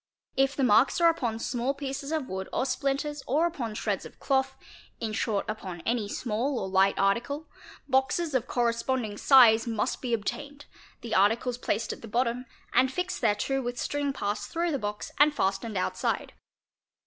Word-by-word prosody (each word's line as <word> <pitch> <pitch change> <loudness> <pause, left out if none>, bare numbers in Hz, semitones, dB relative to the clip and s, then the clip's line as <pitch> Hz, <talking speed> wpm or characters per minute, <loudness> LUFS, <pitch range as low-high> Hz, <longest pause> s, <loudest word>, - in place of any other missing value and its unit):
If 270 +1 +2
the 275 - 0
marks 235 - +4
are 335 -1 +6
upon 240 -9 -2
small 245 +3 -1
pieces 275 +1 -5
of 310 -5 -1
wood 190 0 -5
or - - 0
splinters 275 +2 -1
or 305 +6 +2
upon 260 -10 -3
_ - - -6
shreds - - -1
of - - -12
cloth, 265 -1 0 0.4
in 220 -2 -3
short 210 -1 -1
upon 190 -5 -5
any 230 0 -1
small 240 +5 -1
or 190 -3 -4
ight 195 +1 +3
article, 245 +10 0 0.4
boxes 275 +4 +1
of 255 -1 0
corres 235 -1 0
ponding 230 -6 -2
size 240 -4 +6
must 225 +2 -1
be 240 -3 +1
obtained, 285 +7 -5 0.4
the 230 - -5
articles 230 +5 +2
placed 225 -2 -1
at - - -12
the 230 - -9
bottom, 240 +2 -1 0.3
and 260 0 +4
fixed 360 +5 -3
thereto 235 +4 +1
with 245 -1 -4
string 285 -1 -1
passed 205 -6 -3
through 340 +1 -1
the 280 - -1
box 210 -1 -4
and 295 +1 +5
fastened 195 +2 -1
outside. 185 - -1
245 Hz, 180 wpm, -28 LUFS, 220-275 Hz, 0.4 s, are